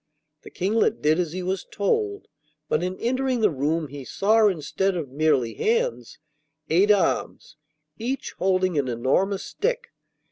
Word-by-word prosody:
The - - -12
Kinglet 215 +4 0
did 155 +3 +3
as 170 -4 -1
he 185 +2 -4
was 190 +1 -2
told, 405 - -1 0.4
but 155 - +1
in 185 +1 -3
entering 255 0 0
the 210 -4 +4
room 150 +2 -1
he 140 0 -8
saw, 215 - +3
instead 190 +2 -1
of 155 -6 -4
merely 140 -4 +1
hands, 470 +2 -1 0.5
eight 190 +6 +4
arms, 190 -5 +1 0.4
each 255 +4 -3
holding 185 -4 +2
an 135 - -1
enormous 135 - 0
stick. - - -2
185 Hz, 145 wpm, -24 LUFS, 155-225 Hz, 0.5 s, the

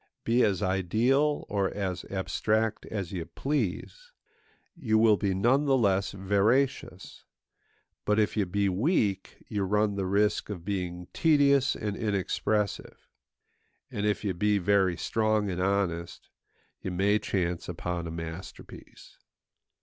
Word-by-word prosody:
Be 120 +2 +2
as 100 -5 +1
ideal 115 +11 +1
or 100 -2 0
as 95 -3 -4
abstract 110 +3 -1
as 100 -5 -4
you 90 -4 -3
please, 150 - -3 0.6
you 115 -10 +1
will 110 -1 +5
be 100 -2 -1
none 130 +9 +2
the 135 -2 +3
less 100 -5 +1
veracious; 100 +8 0 0.8
but 105 0 +1
if 105 -1 +1
you 105 -4 0
be 100 +3 0
weak, 100 - -1
you 105 -2 -2
run 105 +2 +1
the 95 -1 -1
risk 105 +3 +1
of 90 -5 -6
being 90 -3 -4
tedious 140 -4 +3
and 105 -2 -3
inexpressive; 105 0 -2 0.8
and 105 +1 -1
if 105 - -1
you 100 -3 -1
be 105 +4 +1
very 95 -2 +2
strong 110 -1 0
and 90 0 -3
honest, 90 -3 -2 0.5
you - - -4
may 100 +4 +2
chance 90 -5 -2
upon 85 0 -4
a - - -5
masterpiece. 80 +2 -9
100 Hz, 135 wpm, -28 LUFS, 95-110 Hz, 0.8 s, will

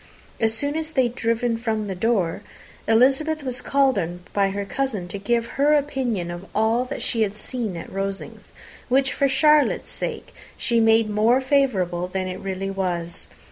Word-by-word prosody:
As 225 -1 +2
soon 285 +5 -1
as 320 0 -3
they 265 -5 +2
had 240 -1 -1
driven 230 -1 0
from 220 -2 -2
the 195 - -3
door, 190 -3 0 0.5
Elizabeth 270 +7 +3
was 255 -2 -3
called 270 -5 +2
on 175 0 -4
by 200 -1 +2
her 200 +1 -3
cousin 215 -5 -2
to 200 - -5
give 235 +3 0
her 285 +5 +2
opinion 255 -11 -1
of 175 +3 -8
all 225 +3 +2
that - - -5
she 230 - -1
had 210 -1 0
seen 220 -6 -3
at 165 - -8
Rosings, 195 0 -5 0.4
which, 270 +1 +3
for 280 - +2
Charlotte's 300 +2 +3
sake, - - -5 0.2
she 235 -2 +1
made 225 0 +4
more 215 +4 +3
favourable 210 -11 +1
than 185 0 -3
it 185 0 -5
really 195 0 -3
was. 175 -3 -3
225 Hz, 180 wpm, -23 LUFS, 195-265 Hz, 0.5 s, made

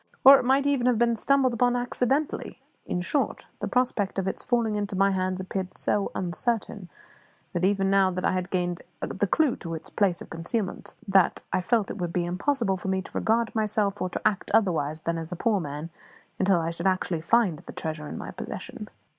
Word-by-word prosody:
Or 275 0 +11
it - - -2
might 270 +2 +3
even 275 -3 +2
have 245 -2 +3
been 235 0 +3
stumbled 265 +2 +2
upon 245 +1 +2
accidentally. 255 +4 -1 0.3
In 180 - -1
short, 275 +10 -1
the - - -2
prospect 240 -7 0
of 195 -1 -1
its 190 - 0
falling 235 -3 +1
into 205 -1 -2
my 195 +1 +3
hands 185 -1 -1
appeared 185 0 -4
so 205 - 0
uncertain, 190 +1 -2 0.7
even 195 +1 +2
now 195 -1 +4
that 185 0 -3
I - - +3
had 185 -1 -2
gained 175 -2 -1 0.2
the 205 0 -1
clue 290 - +2
to 165 -2 -5
its 160 - -9
place 190 -4 +1
of - - -11
concealment, 180 +5 -3
that 195 -2 +3
I - - +2
felt 215 +3 +1
it 205 - -7
would 175 -1 -3
be 175 -1 0
impossible 195 +3 0
for 185 - -7
me 190 0 0
to - - -13
regard 225 0 +1
myself 210 -2 0
or 185 - 0
to 180 - 0
act 205 -3 -1
otherwise 160 -8 +1
than 165 +1 -2
as 165 +1 -7
a - - -3
poor 210 +3 +1
man 150 0 -6 0.5
until 190 -2 +3
I 165 0 -1
should 170 +2 -1
actually 185 -3 0
find 185 -3 +2
the - - -10
treasure 155 -1 -4
in - - -6
my - - -6
possession. - - -7
195 Hz, 205 wpm, -26 LUFS, 180-230 Hz, 0.7 s, Or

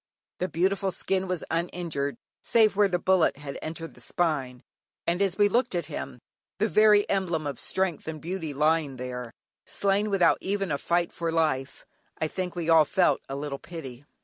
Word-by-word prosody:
The 185 - -1
beautiful 190 +3 +1
skin 190 +1 -1
was 180 -2 -2
uninjured, 165 -4 -2 0.3
save 220 -3 +4
where 205 0 +5
the 180 -2 0
bullet 180 -4 +3
had 140 -1 -7
entered 165 +1 -6
the - - -16
spine, 135 -8 -1 0.4
and 175 +3 +1
as 195 -2 +1
we 205 -1 +5
looked 235 -1 +1
at 170 -3 -1
him, 140 -4 -6 0.4
the 210 +4 +2
very 210 -1 +5
emblem 175 -5 0
of 140 -3 -4
strength 190 -5 -1
and 160 -1 -4
beauty 165 -1 -4
lying 150 0 +1
there, 125 -1 -6 0.4
slain 200 +1 +1
without 195 -3 +3
even 195 -2 -1
a 140 - 0
fight 175 0 +1
for 165 -1 -2
life, 155 -5 -1 0.3
I 160 - 0
think 180 +2 -4
we 170 -2 -3
all 165 -1 +7
felt 175 +5 +2
a 135 - -3
little 140 -1 -4
pity. 140 -7 -9
170 Hz, 180 wpm, -27 LUFS, 150-190 Hz, 0.4 s, all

